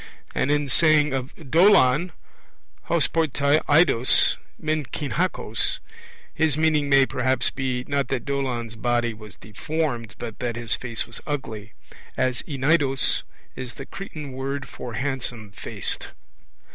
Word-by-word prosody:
And -, -, 0 dB
in 145 Hz, 0 st, +1 dB
saying 150 Hz, 0 st, +4 dB
of 130 Hz, -1 st, -2 dB
Dolon, 165 Hz, 0 st, +4 dB, 0.7 s
hos -, -, +2 dB
p 165 Hz, -, +1 dB
e 160 Hz, -, +1 dB
toi 140 Hz, +2 st, +2 dB
eidos 145 Hz, -5 st, +5 dB, 0.2 s
men 155 Hz, 0 st, -1 dB
heen 140 Hz, +4 st, -5 dB
kakos, 185 Hz, +3 st, 0 dB, 0.6 s
his 155 Hz, -2 st, +1 dB
meaning 155 Hz, -2 st, +2 dB
may 135 Hz, -1 st, +6 dB
perhaps 130 Hz, -1 st, +1 dB
be, 130 Hz, -2 st, -2 dB
not 140 Hz, -2 st, 0 dB
that 130 Hz, -2 st, -2 dB
Dolon's 125 Hz, -5 st, -2 dB
body 120 Hz, 0 st, 0 dB
was 105 Hz, -1 st, -12 dB
deformed, 120 Hz, +1 st, -3 dB
but 115 Hz, -2 st, -7 dB
that 120 Hz, -2 st, -2 dB
his 115 Hz, -2 st, -1 dB
face 120 Hz, -3 st, -4 dB
was 115 Hz, -, -9 dB
ugly, 115 Hz, -7 st, -5 dB, 0.4 s
as 130 Hz, -2 st, 0 dB
eneidos 135 Hz, -1 st, +2 dB, 0.3 s
is 125 Hz, -1 st, -7 dB
the 135 Hz, -, -8 dB
Cretan 155 Hz, -7 st, -8 dB
word 135 Hz, +1 st, -4 dB
for 125 Hz, -1 st, -8 dB
handsome 125 Hz, -5 st, -3 dB
faced. -, -, -3 dB
135 Hz, 140 wpm, -24 LUFS, 120-150 Hz, 0.7 s, may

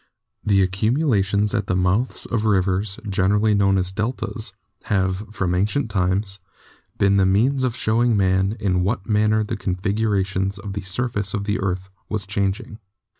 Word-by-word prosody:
The 100 Hz, -2 st, +3 dB
accumulations 105 Hz, -, +1 dB
at 105 Hz, -2 st, -1 dB
the 90 Hz, -, 0 dB
mouths 95 Hz, +7 st, 0 dB
of 115 Hz, -2 st, -1 dB
rivers, 95 Hz, -1 st, +1 dB
generally 105 Hz, +2 st, +2 dB
known 100 Hz, -1 st, +3 dB
as 90 Hz, 0 st, 0 dB
deltas, 110 Hz, +2 st, -3 dB, 0.3 s
have, 95 Hz, +1 st, 0 dB
from 95 Hz, -5 st, -1 dB
ancient 110 Hz, +7 st, 0 dB
times, 95 Hz, +1 st, 0 dB, 0.6 s
been 100 Hz, 0 st, +3 dB
the 95 Hz, -, +4 dB
means 125 Hz, +8 st, +2 dB
of 125 Hz, -3 st, 0 dB
showing 115 Hz, -1 st, +2 dB
Man 95 Hz, +2 st, +1 dB
in 90 Hz, -3 st, +1 dB
what 95 Hz, +1 st, -1 dB
manner 110 Hz, 0 st, +2 dB
the 105 Hz, -, -3 dB
configuration 95 Hz, -1 st, -1 dB
of 100 Hz, -2 st, -5 dB
the 100 Hz, -, -4 dB
surface 100 Hz, +1 st, -2 dB
of 100 Hz, -, -2 dB
the 105 Hz, +1 st, -1 dB
earth 95 Hz, 0 st, -2 dB, 0.2 s
was 105 Hz, -2 st, -2 dB
changing. 100 Hz, +2 st, -2 dB
100 Hz, 155 wpm, -22 LUFS, 95-110 Hz, 0.6 s, the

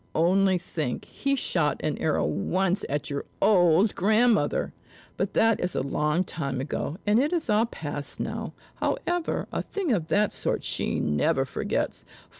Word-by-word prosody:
Only 185 Hz, +3 st, +3 dB
think, 155 Hz, -7 st, -4 dB
he 275 Hz, 0 st, -1 dB
shot 165 Hz, -, +1 dB
an 150 Hz, -, -1 dB
arrow 155 Hz, -2 st, +1 dB
once 185 Hz, -, 0 dB
at 145 Hz, +1 st, -2 dB
your 140 Hz, -, -2 dB, 0.2 s
old 180 Hz, 0 st, +4 dB
grandmother! 225 Hz, -, +2 dB, 0.4 s
But -, -, -2 dB
that 225 Hz, -1 st, +4 dB
is 180 Hz, -, -2 dB
a -, -, 0 dB
long 150 Hz, +5 st, +1 dB
time 140 Hz, -7 st, -4 dB
ago, 145 Hz, +3 st, -3 dB
and 210 Hz, +2 st, +4 dB
it 290 Hz, +4 st, +1 dB
is 335 Hz, -9 st, 0 dB
all 215 Hz, +2 st, +3 dB
past 145 Hz, -8 st, -5 dB
now; -, -, -4 dB, 0.2 s
however, 350 Hz, -1 st, -1 dB
a -, -, -1 dB
thing 385 Hz, -8 st, -3 dB
of 170 Hz, -7 st, -1 dB
that 205 Hz, +3 st, +2 dB
sort -, -, -2 dB
she -, -, -1 dB
never 75 Hz, -1 st, +1 dB
forgets. -, -, -2 dB
180 Hz, 160 wpm, -26 LUFS, 150-220 Hz, 0.4 s, old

